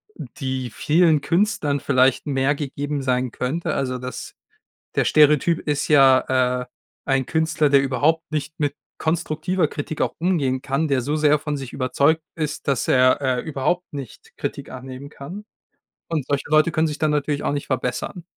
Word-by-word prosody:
die 130 -3 -5
vielen 155 +6 +3
Künstlern 160 -4 +1
vielleicht 130 +1 +2
mehr 135 0 +1
gegeben 145 0 -3
sein 125 -1 0
könnte, 135 +9 -2
also, 130 -1 -1
das 125 0 -7 0.6
der - - +2
Stereotyp 150 +2 +4
ist 145 -2 -2
ja, 130 -3 +4
äh, - - -9 0.4
ein 135 -1 +1
Künstler, 160 +1 +1
der 140 -1 +6
überhaupt 150 +5 +1
nicht 155 0 -4
mit 145 -2 0 0.2
konstruktiver 165 +2 0
Kritik 150 +1 -4
auch - - -1
umgehen 150 -7 0
kann, 140 +3 0
der 140 -3 +1
so 145 +5 -1
sehr 150 -1 +4
von 150 0 -3
sich 135 -3 -7
überzeugt 140 +4 +1
ist, 155 -3 -4
dass 135 -5 +1
er, 130 +1 +4
äh, 130 -2 +1
überhaupt 155 +5 -1
nicht 140 -5 -9
Kritik - - -5
annehmen 130 +2 -8
kann. 170 +9 -9 0.6
Und 155 -5 -2
solche 140 -1 -1
Leute 155 +2 +4
können 160 +1 +2
sich 150 -1 -4
dann 155 - +1
natürlich 145 0 -1
auch - - 0
nicht 145 -1 -3
verbessern. 130 +6 -3
145 Hz, 165 wpm, -22 LUFS, 130-155 Hz, 0.6 s, der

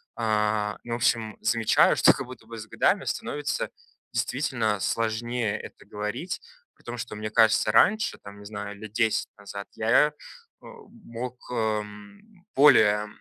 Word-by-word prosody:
А, 105 -2 0
ну, 120 - -5
в - - +1
общем, 115 -2 0
замечаю, 115 -2 +3
что - - +7
как - - -5
будто 125 -3 -12
бы 115 0 -8
с 110 - -7
годами 115 - +1
становится 145 0 -3 0.4
действительно 120 -6 -1
сложнее 115 +1 -1
это - - -12
говорить. 105 - -4 0.3
При - - -27
том 120 +1 -6
что, 120 - -6
мне 105 0 -4
кажется, 110 -1 +4
раньше 215 - +3
там, 100 0 -12
не 105 - -12
знаю, 105 0 -6
лет 105 0 -10
10 110 0 +1
назад, 100 0 -8
я, 115 +6 +4
э, - - -20 0.5
мог, 125 - -9
эм, 105 -3 -3 0.4
более 110 -7 +6
110 Hz, 150 wpm, -26 LUFS, 105-120 Hz, 0.5 s, что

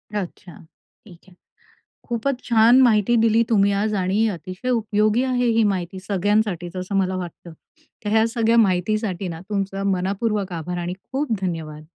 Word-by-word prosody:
अच्छा, 185 -2 -6 0.5
ठीक 175 -5 -15
आहे. 185 - -19 0.7
खूपच 250 +2 -2
छान 235 +2 +5
माहिती 230 -1 +3
दिली 225 0 +4
तुम्ही 200 -3 +3
आज 215 +1 0
आणि 200 +5 +1
अतिशय 185 +7 -7
उपयोगी 215 0 +1
आहे 250 -1 0
ही 230 - +4
माहिती 185 0 -5
सगळ्यांसाठीच, 195 -2 -1
असं 185 +2 -3
मला 190 -1 +1
वाटतं. 175 -1 -8 0.5
तर 205 - -2
ह्या 220 +1 +4
सगळ्या 230 0 +1
माहितीसाठी 195 -1 +1
ना, 165 -1 -6
तुमचा 195 -1 -2
मनःपूर्वक 195 +1 -1
आभार 175 +1 -4
आणि 175 +1 -3 0.2
खूप 275 -1 -1
धन्यवाद. 160 -4 -4
200 Hz, 150 wpm, -22 LUFS, 180-225 Hz, 0.7 s, छान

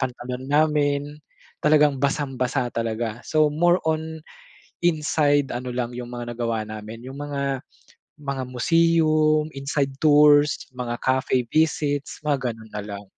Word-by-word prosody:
pantalon 125 0 -4
namin, 145 -1 +2 0.6
talagang 150 -3 +4
basang-basa 135 -2 -1
talaga. 115 0 -3
So 155 -1 +3
more 175 +4 +3
on 160 0 -2 0.6
inside 150 -3 +2
ano 125 0 -5
lang 120 -1 -3
'yung 125 -1 -6
mga 120 -1 -5
nagawa 115 -2 -1
namin 110 +2 -8
'yung 135 - -9
mga, 140 -2 -2 0.6
mga 140 -2 -4
museum, 155 +2 +3
inside 140 0 -1
tours, 150 -1 +6 0.2
mga 120 -1 -4
cafe 130 -1 +2
visits, 150 -3 0
mga 135 -5 -1
ganun 110 0 -14
na 105 - -4
lang. 100 -1 -7
140 Hz, 130 wpm, -23 LUFS, 125-150 Hz, 0.6 s, tours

